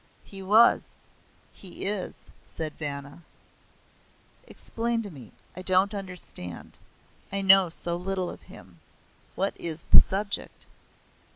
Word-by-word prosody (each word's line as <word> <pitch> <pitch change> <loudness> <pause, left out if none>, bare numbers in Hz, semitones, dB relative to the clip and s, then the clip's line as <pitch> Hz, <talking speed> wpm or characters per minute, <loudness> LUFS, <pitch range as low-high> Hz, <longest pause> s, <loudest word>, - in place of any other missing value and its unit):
"He 195 -1 -11
was. 215 +5 +4 0.6
He 190 -1 -6
is," 200 -1 -4
said 155 -2 -5
Vanna. 140 0 -7 1.3
"Explain 230 0 -3
to 205 - -8
me. 130 -8 -13 0.2
I 185 - -7
don't 185 +2 +2
understand. 180 - -3 0.5
I 195 0 -2
know 190 -1 +6
so 170 +1 -5
little 185 0 -3
of - - -12
him. 90 -2 -16 0.6
What 195 +2 -1
is 165 -1 +5
the - - +8
subject?" 200 +1 -2
185 Hz, 115 wpm, -26 LUFS, 160-195 Hz, 1.3 s, the